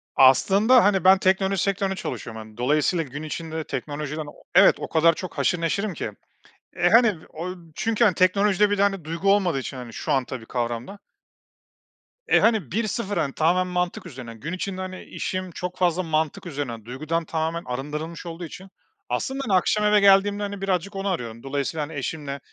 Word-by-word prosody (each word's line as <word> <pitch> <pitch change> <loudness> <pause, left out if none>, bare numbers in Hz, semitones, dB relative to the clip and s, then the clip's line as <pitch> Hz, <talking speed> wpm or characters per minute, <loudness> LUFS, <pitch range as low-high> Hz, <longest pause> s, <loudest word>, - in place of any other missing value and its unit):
Aslında, 200 - +6
hani, 195 -2 +3
ben 190 +1 +7
teknoloji 190 0 +2
sektöründe 195 -1 0
çalışıyorum. 115 - -6
Hani, 110 0 -14
dolayısıyla 150 +7 +1
gün 145 +3 -7
içinde 160 0 -4
teknolojiden 150 +2 -4
o 145 - -13
Evet. - - +7
O - - -4
kadar 165 +1 +4
çok 185 +2 -8
haşır 175 -1 +1
neşirim 200 +4 -1
ki, 115 -8 -4 0.7
eee, - - +3
hani, 230 -1 +6 0.2
o 180 +3 -5 0.2
Çünkü, 225 +1 +1
hani, 205 -5 +4
teknolojide 200 +3 +3
bir 205 - 0
de, - - +3
hani, 195 -4 +1
duygu 165 +5 +1
olmadığı 185 -7 +2
için, 135 0 -5
hani, 125 -2 -8
şu - - -3
an 130 -2 +2
tabii 120 -2 -7
kavramda 120 - -3 1.3
E, - - +5
hani, 220 - +2
1-0 210 0 -2
hani, 140 -3 0
tamamen 180 +3 +2
mantık 180 0 -1
üzerine. 130 -8 -8
Gün 145 +10 -6
içinde, 185 0 -4
hani, 185 0 -6
işim 185 -1 -4
çok 180 +2 -5
fazla 180 0 +1
mantık 155 -1 -1
üzerine. 135 -9 -5
Duygudan 155 +7 -3
tamamen 165 +1 -2
arındırılmış 150 +7 -5
olduğu 170 +1 -6
için, 185 +4 -11 0.4
aslında, 270 0 -2
hani, 210 - 0
akşam 210 +3 +1
eve 210 0 +5
geldiğimde, 200 +1 +4
hani, 200 -1 -5
birazcık 195 +1 -1
onu 195 +1 -3
arıyorum. 115 -9 -4
Dolayısıyla, 140 +3 -2
hani, 160 - -10
eşimle 140 0 -4
170 Hz, 180 wpm, -24 LUFS, 145-195 Hz, 1.3 s, ben